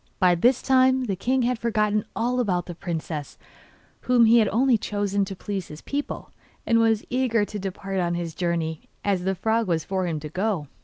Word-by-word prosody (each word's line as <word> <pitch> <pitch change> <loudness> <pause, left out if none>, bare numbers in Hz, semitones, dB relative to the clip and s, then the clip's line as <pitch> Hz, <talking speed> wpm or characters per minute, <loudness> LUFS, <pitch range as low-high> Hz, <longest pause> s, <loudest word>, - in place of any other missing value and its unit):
By 180 -1 +4
this 240 +9 +3
time 260 0 +4
the 205 -6 -1
king 255 +7 0
had 245 -1 0
forgotten 215 -2 +1
all 245 +2 0
about 185 -7 0
the 175 - -6
princess, 160 -3 -5 0.6
whom 245 -2 +4
he 230 +1 +6
had 215 - +3
only 245 +5 +3
chosen 205 -2 -1
to 195 0 -7
please 195 -1 -4
his 150 - -11
people, 285 +1 -4 0.3
and 230 0 +3
was 225 -2 +3
as - - -22
eager 245 -4 +2
to 210 0 -6
depart 195 0 -4
on 175 -1 0
his 170 -2 -4
journey 165 -2 -2 0.2
as 190 -3 0
the 190 0 +1
frog 220 +3 0
was 165 -3 0
for 190 -1 -2
him 160 -3 -2
to 150 - -6
go. 185 -3 -1
205 Hz, 205 wpm, -25 LUFS, 175-230 Hz, 0.6 s, he